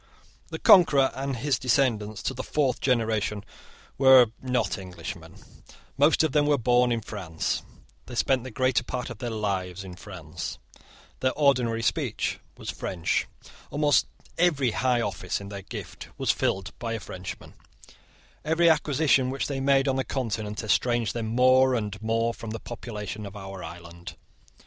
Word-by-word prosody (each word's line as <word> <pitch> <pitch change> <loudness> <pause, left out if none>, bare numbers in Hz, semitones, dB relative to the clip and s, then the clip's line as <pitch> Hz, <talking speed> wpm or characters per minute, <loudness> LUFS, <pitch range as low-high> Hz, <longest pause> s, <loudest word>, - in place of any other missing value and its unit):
The - - -5
Conqueror 145 -8 +6
and 135 0 -3
his 130 +1 0
descendants 115 -6 +1
to - - -1
the 130 - -4
fourth 135 -3 0
generation 110 -4 0 0.6
were 130 -4 +7
not 125 -4 -1
Englishmen: 90 -2 -8 0.6
most 145 +4 +4
of 160 - +1
them 145 +1 +3
were 145 -1 +4
born 125 0 +3
in 115 -1 0
France: 95 -7 -3 0.5
they 120 - -8
spent 130 +1 +2
the 130 - -6
greater 130 0 +1
part 125 0 -4
of 110 - -9
their 120 - -3
lives 95 -4 -2
in 90 -2 -9
France: 90 -6 -7 0.6
their 130 0 +1
ordinary 125 -6 +2
speech - - -1 0.2
was - - -5
French: 85 -3 -1 0.4
almost 145 0 +3 0.3
every 145 -8 +3
high 125 +1 +1
office - - -2
in 100 0 -9
their 100 -1 -6
gift - - -8
was - - +2
filled 95 -2 -1
by 115 -1 -3
a 115 - -3
Frenchman: 95 -3 -8 0.9
every 165 +2 +4
acquisition 140 -4 +2
which 135 +1 -2
they 140 -2 -3
made 135 0 +3
on 135 -1 +1
the 130 - +1
Continent 110 -5 -3
estranged 120 +1 +1
them 115 -2 -3
more 130 +2 +4
and 105 -4 -3
more 115 +1 0
from 115 - -8
the 115 +1 -5
population 110 -3 -6
of 100 - -11
our 95 -2 -8
island. 85 +1 -9
120 Hz, 160 wpm, -26 LUFS, 105-130 Hz, 0.9 s, were